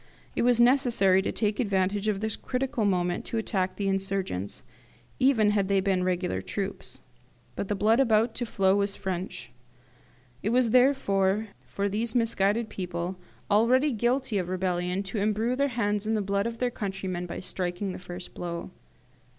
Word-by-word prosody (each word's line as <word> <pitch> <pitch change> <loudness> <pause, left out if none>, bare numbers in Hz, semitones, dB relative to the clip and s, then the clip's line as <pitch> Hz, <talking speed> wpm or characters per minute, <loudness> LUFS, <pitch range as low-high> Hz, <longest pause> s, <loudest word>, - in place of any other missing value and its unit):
It - - +1
was 245 -1 +3
necessary 240 -7 +4
to - - -2
take 210 -2 -1
advantage 200 -2 0
of 205 -2 0
this 220 -1 -1
critical 255 -3 -2
moment 180 -3 0
to 230 - -3
attack 190 -4 -1
the 200 - -2
insurgents, 195 - -2 0.6
even 225 -6 +4
had 200 -2 +1
they 200 0 +3
been 190 -1 +1
regular 180 0 -1
troops. 200 -1 -5 0.5
But 200 - -3
the 205 - -1
blood 220 +4 +3
about 225 -3 +3
to 240 - -3
flow 190 -2 +2
was 200 0 0
French; 180 -10 -5 0.9
it 210 - -1
was 240 -1 +3
therefore 215 -6 +3 0.2
for 200 0 -2
these 220 +3 -2
misguided 225 -1 +2
people, 180 -2 -4 0.3
already 250 +7 +4
guilty 240 -1 0
of 180 -1 -3
rebellion, 180 0 -1
to 195 +2 -3
embrue 215 +4 +1
their 280 +2 +2
hands 205 -1 0
in 220 - +1
the 215 - +1
blood 200 +2 0
of 230 0 -5
their 250 0 0
countrymen 190 -4 -4
by - - -5
striking 185 +1 -3
the - - -7
first 180 0 -8
blow. 170 +1 -5
200 Hz, 165 wpm, -27 LUFS, 190-230 Hz, 0.9 s, necessary